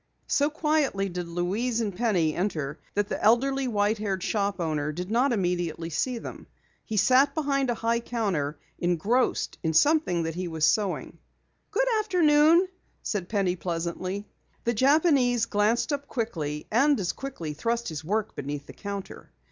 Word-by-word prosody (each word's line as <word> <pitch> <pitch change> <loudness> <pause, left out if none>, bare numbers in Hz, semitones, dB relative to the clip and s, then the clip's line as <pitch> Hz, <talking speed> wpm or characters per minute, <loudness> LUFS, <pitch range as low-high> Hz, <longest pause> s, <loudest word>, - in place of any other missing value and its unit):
So 285 +1 +2
quietly 300 -10 0
did 175 -1 -4
Louise 195 +8 -1
and 210 -5 -2
Penny 180 -8 +1
enter 155 -6 -2 0.2
that 205 0 +1
the - - -4
elderly, 265 +4 +3
white 210 -1 +1
haired 195 -3 -2
shop 200 -2 -1
owner 155 -3 -1
did 180 +5 -5
not 250 +4 +3
immediately 175 -5 -1
see 250 +10 -1
them. - - -8 0.4
He 220 - -4
sat 260 +7 +4
behind 275 -4 0
a 240 - +1
high 230 +1 0
counter, 195 -12 -2 0.2
engrossed 180 +9 0
in 160 -2 -1
something 285 - +3
he 175 +3 -3
was 160 -2 0
sewing. 195 +3 0 0.5
"Good - - +1
afternoon," 340 -3 +4 0.4
said 190 -4 -3
Penny 195 -4 +1
pleasantly. 185 +3 -3 0.4
The 235 - +1
Japanese 260 -2 +3
glanced 220 +7 +1
up 285 0 -3
quickly 160 - -3
and 275 +4 +4
as 180 -3 0
quickly 210 - -6
thrust 235 +9 -1
his 155 -2 -6
work 215 +6 -1
beneath 145 0 -5
the - - -11
counter. 200 -1 -7
205 Hz, 155 wpm, -27 LUFS, 175-255 Hz, 0.5 s, sat